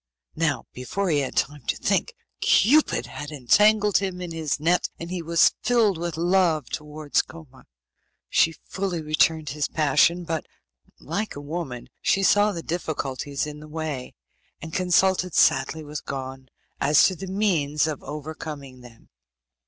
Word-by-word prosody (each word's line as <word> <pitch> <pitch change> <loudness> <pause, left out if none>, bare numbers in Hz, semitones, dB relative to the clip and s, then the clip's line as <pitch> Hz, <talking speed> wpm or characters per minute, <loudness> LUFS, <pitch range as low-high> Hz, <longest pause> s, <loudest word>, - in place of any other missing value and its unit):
Now, 160 -3 0
before 180 +9 -2
he 150 - +3
had 135 - -3
time 145 0 0
to - - 0
think, - - 0 0.3
Cupid 290 +10 +4
had 145 - -7
entangled 210 - +4
him 190 -2 -3
in 175 -2 -6
his 160 -3 -2
net, 170 +4 +2
and 170 +1 -7
he 180 -1 -3
was 165 0 +4
filled 225 -8 +2
with 170 -2 -3
love 170 -3 +2
towards 150 -1 -1
Koma. 150 -6 -14 0.6
She 165 - +3
fully 185 -4 -3
returned 155 0 +2
his 150 +1 -1
passion, 155 +3 +2
but, 160 -2 -3 0.5
like 200 +8 -4
a - - -6
woman, 145 -5 -5
she 195 - +2
saw 205 +2 +4
the 170 -4 -6
difficulties 145 -4 -3
in 150 0 -8
the 155 - -11
way, 150 -5 -5 0.4
and 160 0 -9
consulted 185 0 +2
sadly 135 +4 +3
with 150 0 -7
Gon 130 -1 -6 0.3
as 145 +1 +5
to 185 - +1
the 190 +2 -7
means 170 -8 +1
of 155 -3 -3
overcoming 145 -3 -7
them. 120 -2 -16
160 Hz, 155 wpm, -24 LUFS, 145-180 Hz, 0.6 s, as